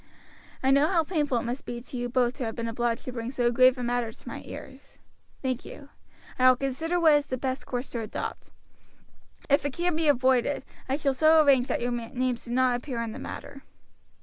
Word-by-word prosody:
I 265 Hz, -, +4 dB
know 280 Hz, +2 st, +5 dB
how 330 Hz, -2 st, +2 dB
painful 295 Hz, -6 st, 0 dB
it 230 Hz, -, -1 dB
must 245 Hz, +3 st, -4 dB
be 240 Hz, 0 st, -5 dB
to 255 Hz, +3 st, -10 dB
you 245 Hz, 0 st, -2 dB
both 245 Hz, -1 st, +2 dB
to 265 Hz, -, -3 dB
have 225 Hz, -, -4 dB
been 230 Hz, 0 st, -3 dB
obliged 230 Hz, 0 st, -1 dB
to 255 Hz, -, -4 dB
bring 230 Hz, -1 st, -4 dB
so 245 Hz, -2 st, +1 dB
grave 255 Hz, +1 st, +5 dB
a 250 Hz, -, -4 dB
matter 240 Hz, -1 st, -1 dB
to -, -, -18 dB
my -, -, -6 dB
ears. -, -, -11 dB, 0.5 s
Thank 255 Hz, -2 st, -1 dB
you; 285 Hz, -1 st, -11 dB, 0.5 s
I 255 Hz, 0 st, +7 dB
will 255 Hz, -, +6 dB
consider 275 Hz, +7 st, -1 dB
what 320 Hz, -3 st, +6 dB
is 290 Hz, 0 st, +2 dB
the 255 Hz, -, -2 dB
best 260 Hz, +1 st, -3 dB
course 245 Hz, +1 st, -3 dB
to 235 Hz, -, -3 dB
adopt. 220 Hz, -2 st, -5 dB, 1.0 s
If 280 Hz, 0 st, +3 dB
it 285 Hz, -2 st, -2 dB
can 345 Hz, +1 st, 0 dB
be 320 Hz, 0 st, +1 dB
avoided, 260 Hz, 0 st, +2 dB, 0.2 s
I 265 Hz, -, +2 dB
shall 280 Hz, -2 st, 0 dB
so 315 Hz, +2 st, +5 dB
arrange 265 Hz, -3 st, +4 dB
that -, -, -1 dB
your 245 Hz, +1 st, -1 dB
names 240 Hz, +1 st, -2 dB
do 235 Hz, -, -7 dB
not 250 Hz, 0 st, +3 dB
appear 245 Hz, -1 st, -5 dB
in 225 Hz, -, -4 dB
the 250 Hz, -, -8 dB
matter." 275 Hz, 0 st, -8 dB
255 Hz, 225 wpm, -27 LUFS, 240-280 Hz, 1.0 s, I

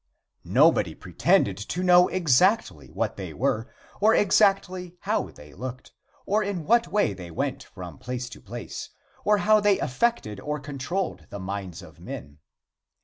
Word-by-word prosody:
Nobody -, -, +4 dB
pretended -, -, +1 dB
to 165 Hz, -, -4 dB
know 180 Hz, 0 st, +6 dB
exactly 185 Hz, -, +2 dB
what -, -, -2 dB
they -, -, -6 dB
were, -, -, -1 dB, 0.3 s
or 215 Hz, +2 st, +5 dB
exactly 185 Hz, -3 st, +2 dB
how -, -, -1 dB
they 75 Hz, 0 st, -15 dB
looked, 125 Hz, +3 st, -7 dB, 0.3 s
or 210 Hz, +2 st, +2 dB
in 200 Hz, -5 st, -3 dB
what 235 Hz, +4 st, +4 dB
way 205 Hz, -, +1 dB
they 90 Hz, -2 st, -9 dB
went 135 Hz, -, -3 dB
from 90 Hz, -6 st, -10 dB
place 125 Hz, +1 st, -4 dB
to -, -, -12 dB
place, 120 Hz, +3 st, -7 dB, 0.3 s
or 210 Hz, 0 st, +4 dB
how 215 Hz, +1 st, +4 dB
they 205 Hz, -2 st, +3 dB
affected 130 Hz, -, -1 dB
or 150 Hz, +7 st, -3 dB
controlled 145 Hz, +7 st, -4 dB
the 100 Hz, -, -7 dB
minds 95 Hz, -2 st, -5 dB
of -, -, -15 dB
men. 70 Hz, +2 st, -9 dB
150 Hz, 150 wpm, -26 LUFS, -, 0.3 s, know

